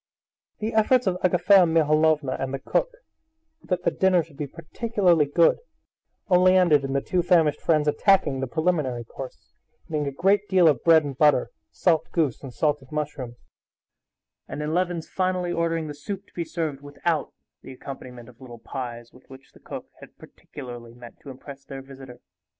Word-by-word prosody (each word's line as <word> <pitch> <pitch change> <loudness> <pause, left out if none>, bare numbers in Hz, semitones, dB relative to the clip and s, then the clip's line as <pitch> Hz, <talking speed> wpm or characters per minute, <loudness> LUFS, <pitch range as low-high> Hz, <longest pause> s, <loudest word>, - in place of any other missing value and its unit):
The 220 +1 -3
efforts 235 +3 +3
of 180 -1 0
Agafea 185 +1 +5
Mihalovna 155 -3 +2
and 135 0 -3
the 135 - -2
cook, - - -1 0.7
that 180 -1 -2
the - - +2
dinner 185 -3 +2
should 160 -2 -19
be 145 +1 -4
particularly 175 - +1
good, 165 +4 +3 0.7
only 185 -1 +5
ended 160 -6 +4
in 135 0 -3
the 140 - 0
two 180 - 0
famished 165 -4 +2
friends 155 -2 +2
attacking 150 -2 +2
the 135 - -2
preliminary 155 -6 -1
course, 130 +3 -11 0.3
eating 150 -2 -2
a - - -2
great 195 +7 +1
deal 185 -3 +5
of 150 - +2
bread 165 -2 +6
and 140 -3 -7
butter, 150 -4 +3 0.2
salt 165 -4 +1
goose 155 -8 0
and 135 - -8
salted 145 -1 -1
mushrooms, 145 -5 -4 1.1
and 150 - -5
in 150 +1 -2
Levin's 175 -2 -1
finally 185 -1 -1
ordering 165 -1 -1
the 150 - -6
soup 195 +7 -7
to - - -28
be 170 - -3
served 155 -5 -4
without 145 +2 -2 0.3
the - - -11
accompaniment 125 -2 -10
of 125 0 -18
little 120 -2 -10
pies, 120 -1 -7
with 125 - -20
which 130 0 -15
the - - -19
cook - - -8
had - - -15
particularly 120 -4 -11
meant 120 -1 -13
to 140 - -12
impress 135 +1 -11
their 135 -1 -9
visitor. 135 -2 -13
150 Hz, 175 wpm, -24 LUFS, 135-175 Hz, 1.1 s, bread